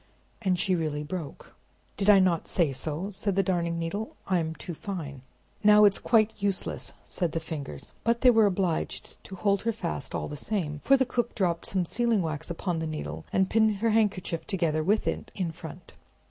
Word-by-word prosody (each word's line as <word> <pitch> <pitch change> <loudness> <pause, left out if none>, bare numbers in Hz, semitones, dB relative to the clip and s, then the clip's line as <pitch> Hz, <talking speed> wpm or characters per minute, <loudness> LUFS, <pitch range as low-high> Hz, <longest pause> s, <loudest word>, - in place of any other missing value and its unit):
And 185 -4 +1
she 185 +2 +1
really 155 -4 -1
broke. 155 -1 -7 0.4
"Did 200 +1 +1
I 205 - +9
not 185 -3 +2
say 165 -6 +1
so?" 160 +8 -3
said 200 0 0
the 195 - +3
Darning 170 -2 0
Needle; 170 +7 -4
"I'm 165 -4 0
too 175 - -7
fine!" 155 -7 -6 0.4
"Now 210 0 +8
it's 200 -1 +4
quite 220 -2 +2
useless," 200 -2 -2
said 175 -4 -2
the 165 - 0
Fingers; 160 -3 -6
but 235 +1 +1
they 255 - +7
were 220 -3 +5
obliged 180 -4 -2
to 190 - -8
hold 200 +1 +1
her 230 - 0
fast, 195 -7 -4
all - - -2
the 150 - -6
same; 150 -3 -3
for 275 - +5
the 260 - +2
cook 240 -1 -2
dropped 170 -4 0
some 185 -2 0
sealing 225 0 +1
wax 160 0 -3
upon 170 0 -2
the 160 - -2
needle, 155 -1 -5
and 190 0 +2
pinned 220 0 +3
her 225 +3 +1
handkerchief 200 -6 0
together 165 -5 0
with 210 +6 +2
it - - -3
in 180 -4 -2
front. 165 +1 -10
185 Hz, 195 wpm, -28 LUFS, 165-210 Hz, 0.4 s, I